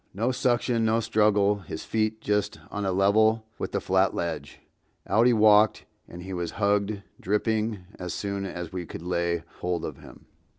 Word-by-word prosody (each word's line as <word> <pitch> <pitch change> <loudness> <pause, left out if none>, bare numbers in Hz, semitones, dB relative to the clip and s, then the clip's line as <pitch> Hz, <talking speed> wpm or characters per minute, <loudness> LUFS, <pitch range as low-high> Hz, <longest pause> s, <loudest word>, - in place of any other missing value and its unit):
No 115 +6 +1
suction, 120 -2 +1
no 110 +1 +2
struggle, 105 -2 +3
his 80 -4 -7
feet 110 0 -1
just 105 0 -1
on 105 0 -3
a - - +1
level 110 +4 +3
with - - -3
the - - 0
flat 95 0 +2
ledge; 80 -4 -4 0.5
out 115 +3 +4
he - - +5
walked 105 -1 +5 0.2
and 90 +1 -10
was 85 -1 -2
hugged, 100 0 +1 0.2
dripping, 105 0 -1
as 90 -1 -4
soon 100 -1 -3
as 90 -3 -6
we 90 -2 -4
could - - -8
lay 85 -1 -1 0.2
hold 90 -2 -2
of - - -6
him. - - -15
100 Hz, 170 wpm, -26 LUFS, 90-110 Hz, 0.5 s, he